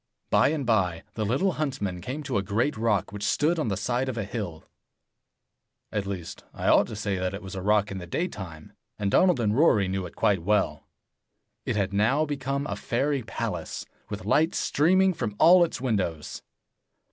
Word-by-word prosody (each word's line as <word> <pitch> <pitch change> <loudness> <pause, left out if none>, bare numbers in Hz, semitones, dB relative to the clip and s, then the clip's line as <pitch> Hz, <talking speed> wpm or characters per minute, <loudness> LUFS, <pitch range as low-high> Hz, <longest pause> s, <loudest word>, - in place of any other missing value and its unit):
By - - +5
and 145 -2 -1
by, 95 -8 +1
the 110 - -2
little 140 - +2
huntsmen 105 - -3
came 135 - -5
to 130 -7 -1
a - - 0
great 110 +9 0
rock 110 -4 0
which 105 - -6
stood 160 +9 +2
on 155 - 0
the 100 -3 -1
side 125 +5 -1
of 120 - -4
a 110 - -1
hill. 100 -6 -5 1.3
At 105 -2 -2
least 90 -4 -6
81 - - -7
I - - +4
ought - - +5
to - - -7
say 100 -2 -2
that 95 +1 -2
it 100 - -8
was 95 - -8
a 95 - -4
rock 105 +1 +2
in 95 - -4
the 90 - -8
daytime, 90 - -5 0.2
and 100 -1 -1
Donald 180 - +4
and 105 -2 +1
Rory 115 - +4
knew 95 -1 -2
it - - -15
quite 100 -4 +2
well. 105 +4 0 0.8
It - - 0
had 100 -1 0
now 115 +10 +2
become 140 -1 -2
a - - -3
fairy 135 +3 -1
palace, - - -4 0.2
with 105 0 -6
lights 160 +3 +2
streaming 185 +5 +3
from 110 -11 -4
all 175 +2 +7
its 170 - -2
windows. 95 - -2
110 Hz, 195 wpm, -26 LUFS, 95-140 Hz, 1.3 s, all